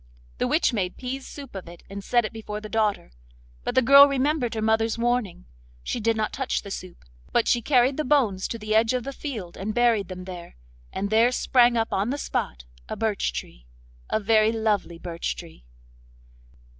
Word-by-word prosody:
The -, -, +1 dB
witch 310 Hz, -5 st, +2 dB
made 185 Hz, -5 st, -2 dB
pease 260 Hz, +1 st, -5 dB
soup 280 Hz, -3 st, -10 dB
of 190 Hz, -3 st, -7 dB
it, 170 Hz, -, -13 dB
and 200 Hz, 0 st, -7 dB
set 240 Hz, +1 st, +2 dB
it 215 Hz, -, -5 dB
before 210 Hz, -1 st, -6 dB
the 215 Hz, -, -8 dB
daughter. 210 Hz, -, 0 dB, 0.5 s
But -, -, -3 dB
the 260 Hz, -, +5 dB
girl 280 Hz, +3 st, +9 dB
remembered 275 Hz, -3 st, 0 dB
her -, -, -2 dB
mother's 220 Hz, +1 st, +1 dB
warning. 235 Hz, -, -1 dB, 0.4 s
She -, -, -3 dB
did 225 Hz, 0 st, +1 dB
not 215 Hz, -1 st, -1 dB
touch 265 Hz, -1 st, -2 dB
the 200 Hz, -, -8 dB
soup, 185 Hz, -2 st, -8 dB, 0.3 s
but 235 Hz, -, +2 dB
she 240 Hz, -, +3 dB
carried 260 Hz, +1 st, +3 dB
the 305 Hz, -, 0 dB
bones 245 Hz, -10 st, +2 dB
to 230 Hz, -, -4 dB
the 215 Hz, -1 st, -3 dB
edge 225 Hz, +2 st, +3 dB
of 250 Hz, -, -2 dB
the 275 Hz, -, -5 dB
field 220 Hz, -, -6 dB
and 210 Hz, +3 st, -4 dB
buried 235 Hz, -5 st, +3 dB
them 185 Hz, -1 st, -7 dB
there; 180 Hz, -2 st, -9 dB, 0.4 s
and 200 Hz, +1 st, -3 dB
there 230 Hz, +3 st, +4 dB
sprang 245 Hz, -1 st, +3 dB
up 225 Hz, 0 st, -1 dB
on 200 Hz, +4 st, 0 dB
the 280 Hz, -, -1 dB
spot 60 Hz, -, -3 dB, 0.2 s
a -, -, -3 dB
birch 220 Hz, -2 st, -1 dB
tree—a -, -, -7 dB
very 215 Hz, +1 st, +3 dB
lovely 215 Hz, -6 st, -1 dB
birch 170 Hz, 0 st, -4 dB
tree. 165 Hz, -, -12 dB
220 Hz, 195 wpm, -25 LUFS, 195-245 Hz, 0.5 s, girl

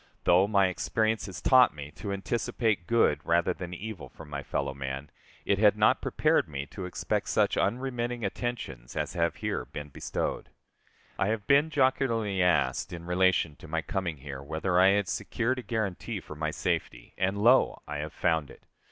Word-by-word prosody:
Though 90 Hz, +3 st, +5 dB
my 100 Hz, -2 st, +4 dB
experience 110 Hz, +4 st, 0 dB
has 95 Hz, -2 st, -8 dB
taught 130 Hz, -, +6 dB
me 75 Hz, 0 st, -8 dB
to 100 Hz, -, -5 dB
anticipate 105 Hz, -1 st, -1 dB
good 115 Hz, -10 st, +3 dB
rather 85 Hz, +2 st, +2 dB
than 90 Hz, -2 st, -7 dB
evil 95 Hz, -1 st, -7 dB
from 75 Hz, -2 st, -13 dB
my 70 Hz, 0 st, -3 dB
fellow 70 Hz, -, -2 dB
man, 70 Hz, +1 st, -5 dB, 0.3 s
it 100 Hz, -, +2 dB
had 105 Hz, -1 st, +5 dB
not 105 Hz, -, +4 dB
prepared -, -, +1 dB
me 70 Hz, -1 st, -4 dB
to 95 Hz, -, -6 dB
expect 90 Hz, -, -2 dB
such -, -, +2 dB
unremitting 120 Hz, 0 st, -1 dB
attentions 95 Hz, -, -4 dB
as -, -, -2 dB
have -, -, 0 dB
here -, -, -2 dB
been 75 Hz, 0 st, -8 dB
bestowed. -, -, -3 dB, 0.7 s
I -, -, +2 dB
have 105 Hz, -1 st, -1 dB
been 140 Hz, +3 st, +4 dB
jocularly 125 Hz, -8 st, +1 dB
asked 85 Hz, -8 st, +2 dB
in 85 Hz, -1 st, -7 dB
relation 90 Hz, -3 st, +2 dB
to -, -, -12 dB
my 80 Hz, +1 st, -2 dB
coming 90 Hz, -5 st, -3 dB
here, 70 Hz, -1 st, -7 dB
whether 80 Hz, +5 st, 0 dB
I 95 Hz, -, +7 dB
had 100 Hz, 0 st, +3 dB
secured 125 Hz, +7 st, -1 dB
a -, -, -4 dB
guarantee 110 Hz, -1 st, -3 dB
for 85 Hz, -, -10 dB
my 80 Hz, +1 st, -2 dB
safety, -, -, -3 dB
and 95 Hz, +2 st, 0 dB
lo! 120 Hz, +6 st, +4 dB
I 75 Hz, 0 st, -4 dB
have 75 Hz, +1 st, -4 dB
found 80 Hz, -4 st, 0 dB
it. -, -, -15 dB
95 Hz, 180 wpm, -28 LUFS, 80-110 Hz, 0.7 s, I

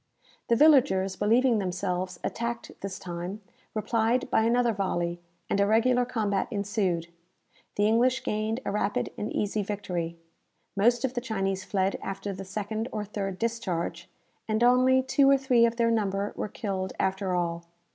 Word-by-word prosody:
The 235 Hz, -, +4 dB
villagers 240 Hz, -10 st, +4 dB
believing 230 Hz, +3 st, +3 dB
themselves 185 Hz, -1 st, -2 dB
attacked 235 Hz, 0 st, -3 dB
this 195 Hz, -1 st, -5 dB
time, 175 Hz, +3 st, -6 dB, 0.4 s
replied 230 Hz, +4 st, 0 dB
by -, -, +4 dB
another 240 Hz, 0 st, +3 dB
volley, 175 Hz, -4 st, -1 dB, 0.3 s
and -, -, 0 dB
a 200 Hz, -, +4 dB
regular 245 Hz, +3 st, +3 dB
combat 210 Hz, -5 st, -1 dB
ensued. 200 Hz, -6 st, -1 dB, 0.7 s
The 205 Hz, -, +2 dB
English 250 Hz, +4 st, +3 dB
gained 215 Hz, +2 st, -1 dB
a -, -, -1 dB
rapid 205 Hz, 0 st, -1 dB
and 210 Hz, -, -4 dB
easy 210 Hz, +1 st, -1 dB
victory, 180 Hz, -5 st, -3 dB, 0.6 s
most 235 Hz, +5 st, +3 dB
of 260 Hz, -, -2 dB
the 245 Hz, -, -2 dB
Chinese 195 Hz, -5 st, -2 dB
fled 195 Hz, 0 st, 0 dB
after 195 Hz, +1 st, -4 dB
the 195 Hz, +1 st, -7 dB
second 215 Hz, +4 st, -3 dB
or 210 Hz, -1 st, -3 dB
third 195 Hz, -2 st, -4 dB
discharge, 185 Hz, -7 st, -3 dB, 0.4 s
and 220 Hz, +1 st, +1 dB
only 255 Hz, +1 st, +5 dB
two 275 Hz, +1 st, +4 dB
or 275 Hz, -, +6 dB
three 250 Hz, -3 st, +4 dB
of 230 Hz, -, -3 dB
their 230 Hz, -1 st, +2 dB
number 200 Hz, -2 st, 0 dB
were -, -, -3 dB
killed 190 Hz, -4 st, -3 dB
after 190 Hz, -1 st, 0 dB
all. 170 Hz, -1 st, -2 dB
210 Hz, 155 wpm, -27 LUFS, 190-235 Hz, 0.7 s, or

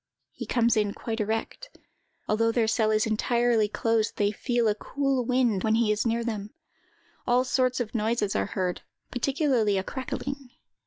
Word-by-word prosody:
He -, -, -8 dB
comes 235 Hz, -1 st, +2 dB
in 210 Hz, -2 st, 0 dB
quite 225 Hz, -1 st, -4 dB
erect. 225 Hz, -, -3 dB, 0.5 s
Although 230 Hz, +2 st, +2 dB
their 230 Hz, -1 st, +1 dB
cell 220 Hz, -1 st, +2 dB
is 215 Hz, 0 st, +2 dB
entirely 230 Hz, 0 st, +2 dB
closed, 225 Hz, +1 st, 0 dB
they 205 Hz, 0 st, +2 dB
feel 240 Hz, +2 st, 0 dB
a 210 Hz, -, +3 dB
cool 270 Hz, +4 st, -1 dB
wind 245 Hz, -6 st, +2 dB
when 220 Hz, 0 st, +2 dB
he 225 Hz, -2 st, +2 dB
is 210 Hz, +2 st, 0 dB
near 230 Hz, +1 st, 0 dB
them. 215 Hz, +1 st, -5 dB, 0.7 s
All 245 Hz, +1 st, +4 dB
sorts 255 Hz, 0 st, +1 dB
of 235 Hz, -3 st, -3 dB
noises 220 Hz, -2 st, 0 dB
are -, -, 0 dB
heard, 185 Hz, -3 st, -2 dB, 0.3 s
particularly 250 Hz, -5 st, +1 dB
a 190 Hz, -, -1 dB
crackling. 275 Hz, +2 st, -5 dB
230 Hz, 165 wpm, -27 LUFS, 215-250 Hz, 0.7 s, All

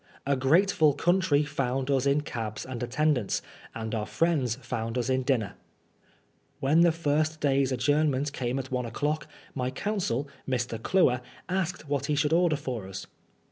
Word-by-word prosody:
A 140 Hz, 0 st, +2 dB
grateful 155 Hz, +3 st, +4 dB
country 170 Hz, -1 st, +2 dB
found 135 Hz, -2 st, -1 dB
us 135 Hz, 0 st, +2 dB
in 140 Hz, +2 st, +3 dB
cabs 115 Hz, -6 st, -5 dB
and 130 Hz, -2 st, -6 dB
attendants, 125 Hz, -2 st, 0 dB, 0.3 s
and 110 Hz, -1 st, -4 dB
our 105 Hz, -2 st, -2 dB
friends 150 Hz, -9 st, +1 dB
found 115 Hz, -2 st, -4 dB
us 125 Hz, +1 st, 0 dB
in 130 Hz, 0 st, +2 dB
dinner. 125 Hz, -6 st, 0 dB, 1.1 s
When 150 Hz, +5 st, +4 dB
the 170 Hz, -1 st, +6 dB
first 155 Hz, -1 st, 0 dB
day's 135 Hz, -2 st, +2 dB
adjournment 145 Hz, +1 st, +1 dB
came 125 Hz, -1 st, -2 dB
at 130 Hz, -1 st, -5 dB
one 125 Hz, -2 st, -1 dB
o'clock, 150 Hz, +6 st, -2 dB, 0.3 s
my 125 Hz, -2 st, -1 dB
counsel, 145 Hz, -, -2 dB, 0.2 s
Mr. 120 Hz, -3 st, -2 dB
Cluer, 125 Hz, -7 st, +3 dB, 0.3 s
asked 185 Hz, -3 st, -2 dB
what 140 Hz, -1 st, -1 dB
he 150 Hz, -, +1 dB
should 150 Hz, +2 st, +1 dB
order 170 Hz, -2 st, +4 dB
for 125 Hz, -8 st, -5 dB
us. 95 Hz, 0 st, -7 dB
140 Hz, 160 wpm, -28 LUFS, 125-155 Hz, 1.1 s, the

